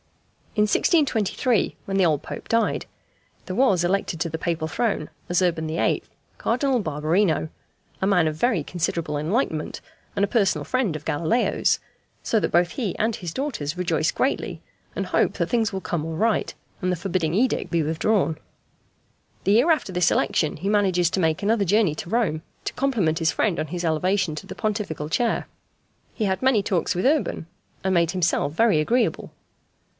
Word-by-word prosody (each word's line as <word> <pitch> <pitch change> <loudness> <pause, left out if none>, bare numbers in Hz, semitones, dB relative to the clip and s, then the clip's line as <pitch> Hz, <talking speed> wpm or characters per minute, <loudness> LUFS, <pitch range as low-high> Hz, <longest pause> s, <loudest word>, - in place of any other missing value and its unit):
In 210 - +4
1623, 230 - +2
when 195 - -3
the 190 -2 +4
old 155 -4 +1
Pope - - -8
died, 230 0 +1 0.6
there 185 - -4
was 200 -9 +3
elected 180 -2 0
to 170 - -1
the 160 +1 -4
Papal 165 -2 -1
throne, 200 -5 -1 0.2
as 175 +1 +2
Urban 165 -3 0
VIII., 160 +1 0 0.4
Cardinal 255 +1 +1
Barberino, 160 +1 +1 0.5
a 190 - +2
man 180 -5 +3
of 155 - -1
very 220 +1 +1
considerable 165 -2 -2
enlightenment, 160 - -1 0.4
and 200 - +3
a - - -7
personal 205 -3 +1
friend 255 -10 0
of 155 - -7
Galileo's, 165 +11 +1 0.4
so 225 - +2
that - - -1
both 175 0 +3
he 220 -9 -3
and 220 0 0
his 175 -3 -6
daughters 185 - -3
rejoice 170 -3 +1
greatly, 270 - -1 0.4
and - - -2
hope - - +2
that - - -2
things 230 -3 +1
will 190 -1 -4
come 170 -4 -2
all 160 0 -4
right, 225 +3 +1 0.3
and 185 -1 0
the - - +1
forbidding 175 -2 -1
edict 250 +5 +1
be 170 -2 +1
withdrawn. 160 +1 +1 1.1
The 200 - +4
year 245 +10 +4
after 310 -11 0
this 180 -1 +3
election 155 - +1
he 180 +6 -4
manages 190 -5 +2
to 190 - 0
make 160 +2 +1
another 215 0 +2
journey 195 -4 +2
to 170 - -7
Rome 215 -9 0 0.2
to - - -2
compliment 215 -13 +1
his 165 -1 +2
friend 190 -7 0
on 155 - -2
his 175 +2 -4
elevation 180 +2 +1
to - - -8
the - - -7
Pontifical 200 -8 -3
chair. 235 +8 0 0.7
He 220 - -1
had 190 -1 0
many 260 -5 +4
talks 180 -4 0
with 180 - -1
Urban, 285 - +1 0.4
and 190 0 +1
made 170 -2 +3
himself 175 -5 +1
very 200 -4 +3
agreeable. 235 +9 0
185 Hz, 180 wpm, -24 LUFS, 160-220 Hz, 1.1 s, In